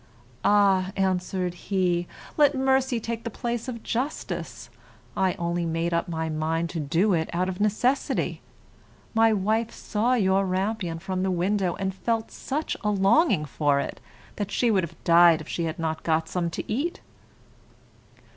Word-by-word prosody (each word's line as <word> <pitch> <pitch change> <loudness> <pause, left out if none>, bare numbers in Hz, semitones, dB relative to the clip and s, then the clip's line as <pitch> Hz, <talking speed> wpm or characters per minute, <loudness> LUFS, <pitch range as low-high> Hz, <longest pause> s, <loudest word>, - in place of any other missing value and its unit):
"Ah," 195 -2 +4
answered 185 -1 0
he, 180 -2 0 0.3
"let 290 -2 +4
mercy 265 -2 +2
take 230 +1 -4
the 230 - -3
place 235 +1 -3
of 230 -3 -6
justice. 170 - -4 0.4
I 190 -1 +2
only 170 -1 -1
made 165 +1 -1
up 170 +3 0
my 160 -1 -2
mind 160 +2 -1
to 170 - -3
do 165 +8 +2
it 160 -2 0
out 180 +2 0
of 185 0 -4
necessity. 230 +6 0 0.7
My 225 0 +5
wife 215 +3 +1
saw 235 +2 0
your 195 -3 +3
rampion 190 -2 -1
from 185 +2 -3
the 190 - 0
window, 185 0 0
and 190 -1 -2
felt 225 +3 -2
such 295 +4 -3
a 210 - +1
longing 200 - +3
for 145 0 +1
it - - -4 0.4
that 205 -2 -2
she 240 -2 +2
would 190 -4 +2
have 170 -1 -8
died 170 -1 +6
if 155 - -9
she 170 - -2
had 160 0 -3
not 160 -1 -2
got 160 0 0
some 175 -1 -1
to - - -4
eat." 280 +11 -2
190 Hz, 165 wpm, -26 LUFS, 170-220 Hz, 0.7 s, died